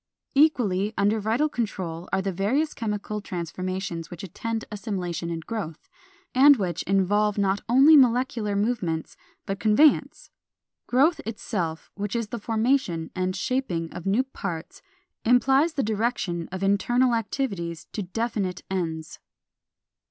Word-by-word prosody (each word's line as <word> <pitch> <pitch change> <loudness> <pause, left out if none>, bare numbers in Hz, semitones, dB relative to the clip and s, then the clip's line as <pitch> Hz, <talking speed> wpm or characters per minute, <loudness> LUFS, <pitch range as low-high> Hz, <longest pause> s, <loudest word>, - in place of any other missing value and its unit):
Equally 220 -9 +2
under 205 +2 +2
vital 225 +8 +1
control 185 - -4
are 190 0 +1
the 195 - -1
various 235 - 0
chemical 210 -1 -3
transformations 185 -1 -4
which 175 0 -9
attend 225 +5 -4
assimilation 185 -5 -3
and 165 -1 -5
growth, 200 -9 -5 0.5
and 280 +2 +7
which 180 -6 -2
involve 200 +2 +2
not 200 0 +1
only 275 +6 +7
molecular 245 -5 +3
movements 200 -7 -1 0.3
but 195 +1 -3
conveyance. 220 +9 +3 0.6
Growth 285 +7 +3
itself, 180 -7 -4
which 205 +2 -4
is 230 -3 -2
the 235 - -4
formation 220 -7 0
and 185 0 -1
shaping 190 -7 -2
of 175 - -6
new 210 +7 +3
parts, 190 -10 -6 0.4
implies 265 +7 +4
the 280 - 0
direction 210 -6 -1
of 190 +1 -4
internal 240 +6 +2
activities 200 - -2
to 210 - -3
definite 195 -2 -3
ends. 160 -4 -3
205 Hz, 130 wpm, -25 LUFS, 185-240 Hz, 0.6 s, and